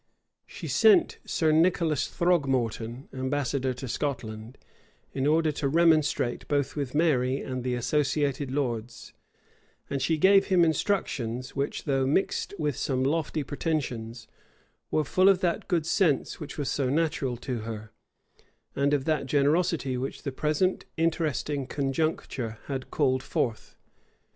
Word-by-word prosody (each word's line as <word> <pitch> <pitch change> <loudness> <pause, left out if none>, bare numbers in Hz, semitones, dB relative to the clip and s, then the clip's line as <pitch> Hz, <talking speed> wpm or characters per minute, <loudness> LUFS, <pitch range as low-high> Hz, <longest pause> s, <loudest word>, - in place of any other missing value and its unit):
She - - -8
sent 400 -6 +4
Sir 160 -2 +1
Nicholas 160 -2 +2
Throgmorton 130 -8 0
ambassador 130 0 -1
to 130 +1 -6
Scotland, 115 -3 -4 0.6
in 135 +1 0
order 160 +1 +3
to 145 -1 -2
remonstrate 155 -5 +2
both 145 -2 0
with 140 -3 -3
Mary 135 -5 +2
and 130 -1 -4
the 125 -1 -1
associated 140 +2 0
lords; 120 -4 -3 0.8
and 140 -1 -1
she 160 +3 +1
gave 195 +4 +5
him 180 -3 +4
instructions, 130 - -1
which, 140 0 -2
though 135 -2 +1
mixed 190 +6 0
with 150 -4 -1
some 130 -2 0
lofty 155 +1 0
pretensions, 125 -6 -3 0.6
were 155 - +1
full 185 +6 +4
of 195 -1 +3
that 175 -2 -1
good 170 -5 +1
sense 165 -4 +1
which 150 - -8
was 145 -3 -2
so 135 -3 0
natural 140 -4 0
to 125 0 -4
her, 110 -1 -7 0.8
and 140 +1 +2
of 135 -2 -2
that 155 -4 0
generosity 145 -1 +1
which 130 +2 -5
the 140 - -3
present 155 +7 0
interesting 150 -4 -1
conjuncture 135 -5 -2
had 135 -2 -5
called 130 -3 +1
forth. 115 -4 -3
140 Hz, 135 wpm, -27 LUFS, 130-160 Hz, 0.8 s, gave